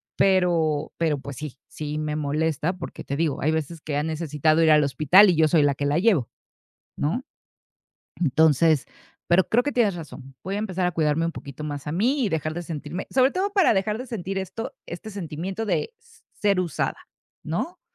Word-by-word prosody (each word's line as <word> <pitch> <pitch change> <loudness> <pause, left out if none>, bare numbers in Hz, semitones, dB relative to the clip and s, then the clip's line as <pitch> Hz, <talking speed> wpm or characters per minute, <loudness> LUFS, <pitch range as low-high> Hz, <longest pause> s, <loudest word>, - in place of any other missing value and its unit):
Pero, 170 -6 +2
pero, 160 -3 +1
pues 140 0 -8
sí, 150 -1 -7
sí 150 0 -5
me 150 -1 -2
molesta, 155 +2 0
porque 180 -2 -8
te 140 - -4
digo, 155 -3 0
hay 155 - +2
veces 160 +1 -3
que 145 -2 -3
ha 145 - 0
necesitado 155 0 +1
ir 160 - +5
al 150 -1 +6
hospital 155 +9 +6
y 180 - +3
yo 160 0 +4
soy 165 -2 +4
la 145 -1 +2
que 145 - -3
la 145 +3 +2
llevo, 185 - +2 0.7
¿no? 175 - -1 0.9
Entonces, 155 -1 +3 0.4
pero 175 +1 +4
creo 240 +2 +3
que 290 - -2
tienes 220 -6 +2
razón. 140 -5 -10
Voy 195 - -4
a - - -1
empezar 190 -4 -1
a 180 - -1
cuidarme 155 0 +1
un 170 - -3
poquito 140 -1 -9
más 145 -1 -5
a 150 - -3
mí 250 - +1
y - - +1
dejar 155 -1 -1
de 175 - -4
sentirme 165 +2 -6
sobre 260 0 +4
todo 390 +2 -1
para 390 -4 +4
dejar 210 +2 0
de 255 - -6
sentir 195 -5 -5
esto, 190 +4 -5
este 175 +5 -7
sentimiento 190 +2 -4
de 450 - -1
s - - -23
ser 200 -2 +1
usada, 170 -5 -2 0.5
¿no? 170 - -4
165 Hz, 200 wpm, -24 LUFS, 150-190 Hz, 0.9 s, al